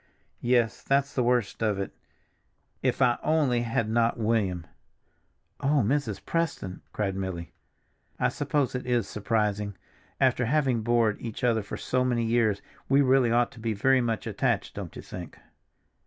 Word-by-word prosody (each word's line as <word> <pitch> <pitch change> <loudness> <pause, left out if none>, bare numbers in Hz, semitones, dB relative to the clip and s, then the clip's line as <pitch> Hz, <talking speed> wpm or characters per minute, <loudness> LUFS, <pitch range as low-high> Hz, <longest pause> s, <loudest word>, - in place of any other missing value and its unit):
"Yes, 120 -2 +2
that's 140 0 +1
the 125 - +1
worst 120 -4 +1
of 105 -3 +1
it—if 95 - -5
I 120 -1 +3
only 145 -6 +2
had 115 -1 0
not 115 +1 +2
William!" 105 -7 0 0.9
"Oh, 140 -1 +2
Mrs. 140 +5 -1
Preston!" 160 - -2
cried 100 -3 -2
Milly. 95 -3 -4 0.7
"I - - +3
suppose 145 -4 0
it 125 0 -4
is 120 -4 +1
surprising. 105 -2 -1 0.4
After 130 -2 +3
having 130 -4 +2
bored 115 -2 +2
each 115 +2 -6
other 115 -2 +3
for 100 - -6
so 130 0 0
many 120 -2 +1
years, 110 -3 +1 0.3
we 140 +1 +5
really 130 -2 +4
ought 120 0 +2
to 115 - -14
be 110 0 -1
very 130 +6 +3
much 115 -2 -1
attached, - - -1
don't - - -7
you - - -8
think? - - -8
120 Hz, 155 wpm, -27 LUFS, 105-130 Hz, 0.9 s, we